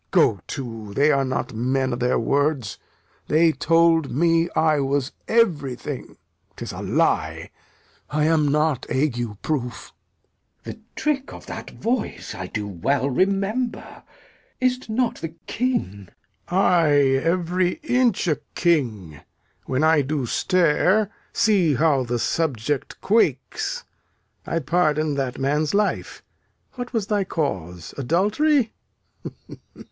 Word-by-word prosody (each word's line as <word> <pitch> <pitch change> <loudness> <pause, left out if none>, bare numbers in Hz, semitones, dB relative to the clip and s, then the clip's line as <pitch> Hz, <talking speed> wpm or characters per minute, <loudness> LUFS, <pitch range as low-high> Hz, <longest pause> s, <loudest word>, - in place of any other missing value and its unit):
Go - - +3
to, 115 -6 -6
they 145 +4 +4
are 140 -1 +2
not 130 -2 -2
men 130 +3 0
o' - - 0
their 125 +1 +1
words! 140 -2 0 0.5
They 160 +2 +4
told 165 -1 +3
me 165 +3 +2
I 155 -1 +3
was 140 0 0 0.2
everything. 145 - 0 0.4
'Tis - - -6
a - - -7
lie - - 0 0.6
I 150 +1 0
am 155 -1 +3
not 150 -2 +1
ague 120 -7 -1
proof. 125 -6 -3 0.7
Glou. - - -6
The - - -19 0.2
trick 280 -3 -1
of - - -11
that - - -7
voice 235 0 -3
I 95 0 -6
do 105 0 -4
well 135 +9 0
remember. 200 - -1 0.6
Is't 255 -1 0
not 240 +2 0
the 165 0 -6
King? 210 - -2 0.4
Lear. 185 - +2
Ay, 165 -6 +4 0.3
every 175 +1 +1
inch 250 - +2
a 155 -4 +2 0.2
king! 110 - 0 0.5
When 130 +3 0
I 160 -1 +5
do 140 -1 -2
stare, 185 - +2 0.2
see 190 -9 +3
how 140 -2 +2
the 120 0 -1
subject 145 0 -1
quakes. 155 - 0 0.6
I 165 - -1
pardon 155 -1 +1
that 135 -2 -2
man's 150 +6 0
life. 210 0 -1 0.5
What 245 -1 -6
was 225 -5 -1
thy 205 -1 +1
cause? 90 - -4
Adultery? 220 - +2
155 Hz, 125 wpm, -23 LUFS, 130-185 Hz, 0.7 s, I